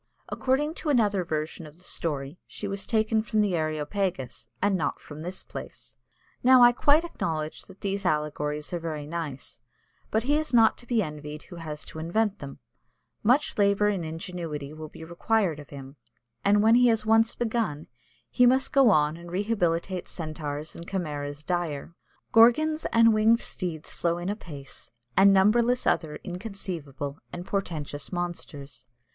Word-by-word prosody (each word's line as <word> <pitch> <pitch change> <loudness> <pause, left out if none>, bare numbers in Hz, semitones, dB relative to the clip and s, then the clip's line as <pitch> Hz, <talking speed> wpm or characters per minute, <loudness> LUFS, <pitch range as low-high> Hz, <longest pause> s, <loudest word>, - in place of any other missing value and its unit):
According 285 +4 0
to 310 - -2
another 210 -8 +3
version 155 0 -4
of 150 +2 -15
the 180 - -18
story, 145 -2 -4
she 205 - -6
was 200 0 -4
taken 220 -1 +2
from 215 -1 0
the 200 -4 +1
Areopagus, 155 0 -2
and 200 0 +2
not 160 -6 -1
from 150 0 -10
this 180 +3 -6
place. - - -9 0.5
Now 255 0 +7
I 240 - +9
quite 290 +6 +4
acknowledge 160 - -3
that 190 0 -16
these 200 0 -2
allegories 150 -1 -1
are 175 - -1
very 155 -3 -4
nice, 150 -4 -6 0.5
but 220 - +1
he 290 +4 +2
is 310 -5 -1
not 225 -1 +6
to 240 - -16
be 230 -4 +2
envied 150 -1 -7
who 175 - -11
has 155 -2 -6
to 160 - -9
invent 205 +6 0
them; 140 -1 -8 0.6
much 250 +2 +2
labour 200 +1 +4
and 195 -4 -1
ingenuity 160 -3 -5
will 155 0 -8
be 160 - -11
required 170 0 0
of 145 - -11
him; 135 0 -10 0.5
and 205 +1 +4
when 225 +1 +6
he 245 +1 +6
has 225 -2 +2
once 225 +1 +4
begun, 225 -10 -1 0.5
he 245 - +5
must 260 +2 +2
go 270 -4 +6
on 150 -5 +3
and 170 0 -11
rehabilitate 185 -3 -1
centaurs 155 -2 -5
and 170 - -9
chimeras 145 -5 -4
dire. 170 -3 -2 0.4
Gorgons 310 +8 +5
and 230 -1 +6
winged 220 +2 +4
steeds 170 -5 -4
flow 170 0 0
in 175 +2 -3
apace, 150 -9 -7 0.3
and 195 +1 +7
numberless 230 +6 +4
other 155 -3 +1
inconceivable 175 -8 -6
and 175 0 -6
portentous 155 -8 -4
monsters. 145 -8 -5
180 Hz, 165 wpm, -27 LUFS, 155-220 Hz, 0.6 s, I